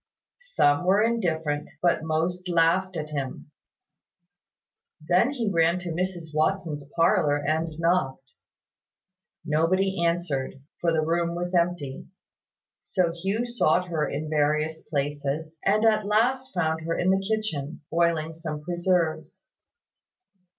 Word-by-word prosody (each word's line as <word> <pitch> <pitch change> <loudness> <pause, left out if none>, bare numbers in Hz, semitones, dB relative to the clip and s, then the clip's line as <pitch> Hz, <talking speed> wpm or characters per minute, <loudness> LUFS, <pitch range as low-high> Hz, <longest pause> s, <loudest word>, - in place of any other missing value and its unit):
Some 145 +3 +4
were 195 +4 +4
indifferent, 160 -10 -1
but 175 -3 +2
most 170 +3 -2
laughed 175 +2 +2
at 155 -1 -5
him. 140 0 -5 1.5
Then 180 +9 +2
he 250 -6 -3
ran 165 0 +3
to 180 -1 -5
Mrs 175 -2 -3
Watson's 155 -3 -1
parlour, 165 -4 +3
and 160 +3 -1
knocked. 135 -6 0 1.1
Nobody 175 +4 +1
answered; 170 -6 -1 0.2
for 170 - +1
the 160 -1 +1
room 170 +1 0
was 175 +1 -3
empty: 170 -6 -1 0.7
so 180 -3 0
Hugh 195 +7 -2
sought 185 -7 +1
her 155 -3 -1
in 150 +2 -4
various 155 +1 0
places, 145 +2 -3
and 210 +3 +3
at 215 -2 +3
last 255 +5 +1
found 160 -3 0
her 165 +1 -2
in 185 - +2
the 190 0 +2
kitchen, 195 -9 -3
boiling 165 -1 +1
some 155 -2 -6
preserves. 175 -1 -1
170 Hz, 120 wpm, -26 LUFS, 155-185 Hz, 1.5 s, Some